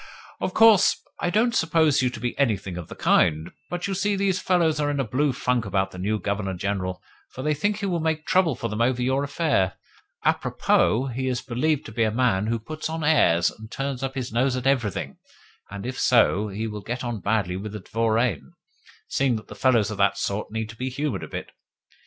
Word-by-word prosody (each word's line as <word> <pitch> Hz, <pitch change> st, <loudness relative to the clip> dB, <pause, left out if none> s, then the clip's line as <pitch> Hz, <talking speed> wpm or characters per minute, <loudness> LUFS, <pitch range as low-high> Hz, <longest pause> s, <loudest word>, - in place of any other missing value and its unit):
"Of -, -, -3 dB
course, 225 Hz, -4 st, +6 dB, 0.2 s
I -, -, 0 dB
don't 225 Hz, +5 st, +2 dB
suppose 160 Hz, -, +3 dB
you 125 Hz, -, +2 dB
to 120 Hz, -2 st, -8 dB
be 120 Hz, +1 st, -3 dB
anything 100 Hz, -9 st, 0 dB
of 85 Hz, -2 st, -6 dB
the -, -, -9 dB
kind, 80 Hz, 0 st, +2 dB, 0.2 s
but, 175 Hz, 0 st, -3 dB
you 200 Hz, -, -2 dB
see, 200 Hz, +2 st, 0 dB
these 195 Hz, -2 st, +1 dB
fellows 165 Hz, -4 st, +2 dB
are 145 Hz, -1 st, +1 dB
in 145 Hz, -1 st, -1 dB
a -, -, +2 dB
blue 135 Hz, +5 st, +1 dB
funk 125 Hz, -2 st, 0 dB
about 95 Hz, -1 st, -1 dB
the 90 Hz, -, -9 dB
new 105 Hz, +4 st, 0 dB
Governor 100 Hz, 0 st, -2 dB
General, 95 Hz, -1 st, -3 dB, 0.3 s
for 130 Hz, -, -8 dB
they 150 Hz, -, +2 dB
think 205 Hz, +8 st, 0 dB
he 210 Hz, -, -3 dB
will 175 Hz, -3 st, 0 dB
make 160 Hz, -1 st, -1 dB
trouble 180 Hz, -7 st, +3 dB
for 115 Hz, -, -3 dB
them 110 Hz, 0 st, -3 dB
over 125 Hz, +1 st, +2 dB
your 130 Hz, +3 st, +1 dB
affair. 140 Hz, -, 0 dB, 0.5 s
A -, -, +5 dB
propos, 130 Hz, +4 st, +1 dB
he 130 Hz, +2 st, -2 dB
is 125 Hz, -1 st, -1 dB
believed 140 Hz, +5 st, 0 dB
to -, -, -8 dB
be 115 Hz, -, -3 dB
a 110 Hz, -, +3 dB
man 110 Hz, -3 st, +1 dB
who 115 Hz, +1 st, 0 dB
puts 155 Hz, +8 st, -6 dB
on 160 Hz, 0 st, -3 dB
airs, 85 Hz, -, +4 dB
and 110 Hz, 0 st, -12 dB
turns 135 Hz, +1 st, -4 dB
up 135 Hz, 0 st, -3 dB
his 125 Hz, -4 st, -4 dB
nose 125 Hz, +2 st, +2 dB
at 125 Hz, 0 st, -4 dB
everything; 125 Hz, -8 st, 0 dB, 0.5 s
and 100 Hz, +1 st, -7 dB
if 130 Hz, +1 st, -4 dB
so, 110 Hz, -4 st, +3 dB
he 105 Hz, +2 st, -4 dB
will 105 Hz, -2 st, -5 dB
get 125 Hz, +5 st, -4 dB
on 120 Hz, -3 st, -3 dB
badly 100 Hz, -3 st, 0 dB
with 100 Hz, +2 st, -6 dB
the 105 Hz, -, -6 dB
dvoriane, 115 Hz, -, 0 dB, 0.5 s
seeing 135 Hz, -3 st, +1 dB
that 105 Hz, -1 st, -8 dB
fellows 115 Hz, -2 st, +2 dB
of 105 Hz, -, -6 dB
that 100 Hz, 0 st, +3 dB
sort 100 Hz, +2 st, -2 dB
need 110 Hz, 0 st, -3 dB
to 115 Hz, -, -9 dB
be 130 Hz, +3 st, -3 dB
humoured 135 Hz, -5 st, -2 dB
a -, -, -6 dB
bit. -, -, -7 dB
125 Hz, 225 wpm, -24 LUFS, 105-150 Hz, 0.5 s, course